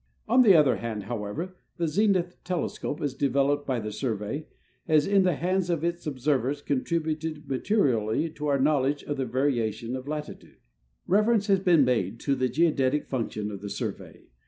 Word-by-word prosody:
On 250 +3 +5
the 205 -7 +7
other 150 -5 +5
hand, 110 -3 -4
however, 120 - -5 0.2
the 170 - 0
zenith 180 0 +1
telescope, 175 -3 -3
as 145 -3 -1
developed 140 +1 +1
by 130 -3 0
the 105 -1 -5
Survey, 110 +5 -3 0.4
has 155 -2 +4
in 200 -1 +4
the 180 -4 +2
hands 180 +3 0
of 165 -3 0
its 170 -1 -2
observers 140 0 -1
contributed 155 +2 -2
materially 130 - +1
to 150 -1 -5
our 140 -1 +2
knowl 140 -1 +3
edge 145 +1 -2
of 145 - -4
the 135 -1 -2
variation 120 -2 -1
of 130 +1 -7
latitude. 150 0 -7 0.5
Reference 210 +2 +3
has 195 -2 +3
been 175 -7 +4
made 115 -4 0
to 140 - +1
the 130 -1 0
geodetic 150 -2 +1
function 110 -4 -3
of 100 -2 -7
the 100 - -6
Sur - - -2
vey. - - -15
145 Hz, 180 wpm, -27 LUFS, 125-170 Hz, 0.5 s, the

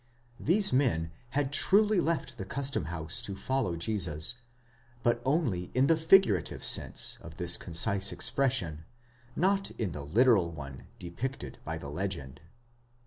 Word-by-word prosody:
These 195 +3 +2
men 115 - +1 0.3
had 145 -1 -1
truly 210 +4 +4
left 155 -7 -3
the - - -3
custom 135 - -2
house 80 -1 -2
to 100 - -5
follow 130 -4 -2
Jesus; 90 +3 +1 0.6
but 120 0 +1
only 130 - -1
in 130 +2 +4
the 165 - +4
figurative 160 - +3
sense - - +1
of 85 -1 -12
this 85 -1 +3
concise 100 +4 +2
expression, 90 - 0 0.5
not 195 +3 +1
in 105 -6 -2
the 75 - -6
literal 100 - +3
one 70 -5 -10
depicted 115 +11 -6
by 80 +1 -5
the 70 -3 -8
legend. 75 -6 -5
100 Hz, 140 wpm, -29 LUFS, 85-135 Hz, 0.6 s, truly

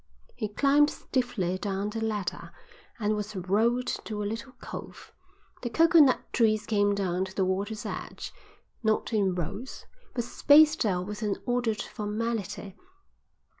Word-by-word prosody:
He 215 - -2
climbed 285 +7 +4
stiffly 190 -12 -2
down 200 +1 -2
the 225 +1 -3
ladder 210 -4 -3 0.5
and 215 -1 +1
was 210 0 -4
rowed 220 +7 +1
to 215 -4 -3
a - - -2
little 225 +5 -5
cove. - - -9 0.5
The 240 - -3
coconut 325 -2 +5
trees 215 -2 +3
came 205 -2 +2
down 190 -2 0
to 190 - -11
the 190 - +2
water's 200 +4 -2
edge, - - -6 0.5
not 220 +1 0
in 195 -4 +2
rows, 180 +9 -5 0.3
but 240 - 0
spaced 300 +2 +5
out 180 -2 0
with 210 +2 -6
an 205 -2 0
ordered 240 -3 0
formality. 210 -2 -4
215 Hz, 140 wpm, -28 LUFS, 200-240 Hz, 0.5 s, coconut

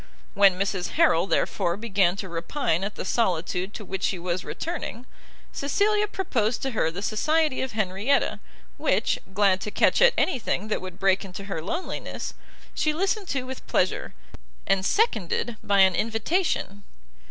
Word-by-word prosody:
When 195 -2 +5
Mrs 190 -2 -2
Harrel, 195 - +4
therefore, 175 -2 0
began 195 -5 +2
to 200 -1 -5
repine 170 - -1
at 200 +1 -3
the - - -5
solitude 185 -2 0
to 210 - -7
which 190 +1 -5
she 195 - 0
was 175 +1 -3
returning, 315 -8 -5 0.5
Cecilia 415 +8 +1
proposed 250 - -1
to 270 - -1
her 210 -8 +1
the 180 +5 -6
society 305 +7 +1
of 260 -3 -3
Henrietta, 210 +6 +1 0.4
which, - - +1 0.2
glad 195 -2 +3
to - - -3
catch - - +3
at - - +6
any 315 - +1
thing 215 -1 -2
that - - -1
would 185 -1 -8
break 195 0 +2
into 195 0 -8
her 195 -5 -4
loneliness, 330 - -4 0.4
she 305 - +1
listened 385 +4 -1
to 270 -5 -1
with 260 0 -8
pleasure, - - 0 0.5
and 195 -1 +2
seconded 240 - +1
by 200 -1 +4
an 190 -1 +6
invitation. 225 - -1
205 Hz, 160 wpm, -25 LUFS, 190-280 Hz, 0.5 s, at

